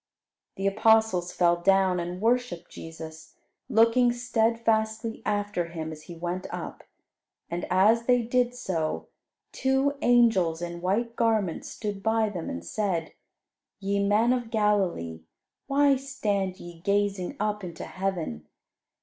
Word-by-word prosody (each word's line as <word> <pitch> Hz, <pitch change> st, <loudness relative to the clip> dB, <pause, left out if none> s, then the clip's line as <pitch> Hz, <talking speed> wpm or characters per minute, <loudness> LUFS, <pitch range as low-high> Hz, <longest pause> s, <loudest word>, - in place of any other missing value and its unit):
The 195 Hz, -, -4 dB
apostles 215 Hz, -3 st, +3 dB
fell 175 Hz, -1 st, +3 dB
down 190 Hz, 0 st, +3 dB
and 175 Hz, +1 st, -4 dB
worshipped 230 Hz, -6 st, 0 dB
Jesus, 160 Hz, -1 st, -10 dB, 0.3 s
looking 230 Hz, +2 st, +4 dB
steadfastly 225 Hz, -2 st, 0 dB
after 205 Hz, -4 st, -1 dB
Him 160 Hz, -2 st, -5 dB
as 155 Hz, -1 st, -9 dB
He 170 Hz, -, -7 dB
went 175 Hz, +3 st, -4 dB
up; -, -, -6 dB, 0.7 s
and 175 Hz, +1 st, -3 dB
as 210 Hz, +6 st, +4 dB
they 245 Hz, -1 st, +4 dB
did 245 Hz, +1 st, +1 dB
so, 165 Hz, -10 st, -3 dB, 0.4 s
two 265 Hz, +1 st, +1 dB
angels 225 Hz, -9 st, +4 dB
in 170 Hz, 0 st, -5 dB
white 225 Hz, +6 st, 0 dB
garments 220 Hz, -7 st, 0 dB
stood 205 Hz, -2 st, -5 dB
by 220 Hz, 0 st, +2 dB
them, 175 Hz, -5 st, -5 dB
and 85 Hz, 0 st, -6 dB
said, 175 Hz, -, -2 dB, 0.7 s
"Ye 200 Hz, 0 st, -1 dB
men 215 Hz, +5 st, +3 dB
of 245 Hz, -3 st, -2 dB
Galilee, 195 Hz, -, 0 dB, 0.5 s
why 280 Hz, 0 st, +4 dB
stand 205 Hz, -9 st, -2 dB
ye 175 Hz, -1 st, -10 dB
gazing 200 Hz, 0 st, 0 dB
up 210 Hz, 0 st, -1 dB
into 170 Hz, -2 st, -7 dB
heaven? 170 Hz, -, -4 dB
200 Hz, 130 wpm, -27 LUFS, 175-230 Hz, 0.7 s, looking